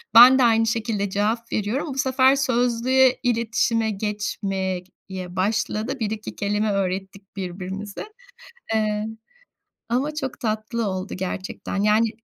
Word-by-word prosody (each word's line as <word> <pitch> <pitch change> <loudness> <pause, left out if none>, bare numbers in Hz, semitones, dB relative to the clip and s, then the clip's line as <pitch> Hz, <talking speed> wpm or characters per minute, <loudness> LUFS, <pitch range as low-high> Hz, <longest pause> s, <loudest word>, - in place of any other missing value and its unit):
Ben 250 +3 +10
de - - +5
aynı 225 -1 +4
şekilde 220 -3 -1
cevap 220 +4 -1
veriyorum. 220 +9 -1
Bu - - -9
sefer 260 0 +4
sözlüye, 255 0 +3
iletişime 230 -2 +1
geçmek 195 -3 -3 0.2
ye 185 -1 -6
başladı. 215 +5 -1
1-2 220 -1 -4
kelime 210 +1 0
öğrettik 195 +1 -3
birbirimize, 190 +2 -5 0.7
ııı, 210 -1 0 0.8
ama 270 +6 0
çok 270 -4 -4
tatlı 220 0 -2
oldu 190 0 -4
gerçekten. 185 +1 -4
Yani, 215 +2 +4
215 Hz, 120 wpm, -23 LUFS, 195-240 Hz, 0.8 s, Ben